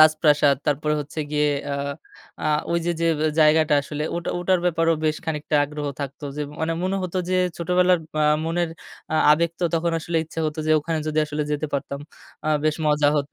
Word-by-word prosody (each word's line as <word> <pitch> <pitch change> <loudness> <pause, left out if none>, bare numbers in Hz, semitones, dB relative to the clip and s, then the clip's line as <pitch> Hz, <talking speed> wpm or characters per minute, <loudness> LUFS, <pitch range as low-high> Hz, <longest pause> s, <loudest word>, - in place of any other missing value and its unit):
রাজপ্রাসাদ। 150 -2 +5
তারপরে 150 +1 +1
হচ্ছে 145 +2 -5
গিয়ে 150 0 +2 0.2
আ - - 0 0.7
আ - - +1 0.3
ওই 170 - +2
যে, 175 - +2
যে, 170 - +2 0.3
জায়গাটা 155 0 +5
আসলে 150 +1 -5
ওটা, 175 - -3
ওটার, 180 +1 +2
ব্যাপারেও 165 -1 +2
বেশ 155 0 +1
খানিকটা 150 -1 -1
আগ্রহ 150 0 -5
থাকত। 140 +1 -5 0.2
যে, 150 - -2
ম - - -12
মানে 160 +1 0
মনে 190 +1 0
হত 185 -1 -5 0.2
যে, 185 - +2 0.2
ছোটবেলার 180 +1 +3 0.2
আ - - +4 0.2
মনের 170 +1 0 0.4
আ - - +1 0.2
আবেগ 170 +2 +2
তো - - +1
তখন 165 +1 0
আসলে 165 +1 -3
ইচ্ছা 160 +1 -6
হত 150 - -4
যে, 155 - +1
ওখানে 160 +1 -2
যদি 155 0 -1
আসলে 150 0 -2
যেতে 150 +1 -1
পারতাম। 140 0 -3 0.5
আ - - +1 0.2
বেশ 155 -1 +2
মজা 150 -1 +3
হত। 145 -1 -1
155 Hz, 200 wpm, -23 LUFS, 150-170 Hz, 0.7 s, রাজপ্রাসাদ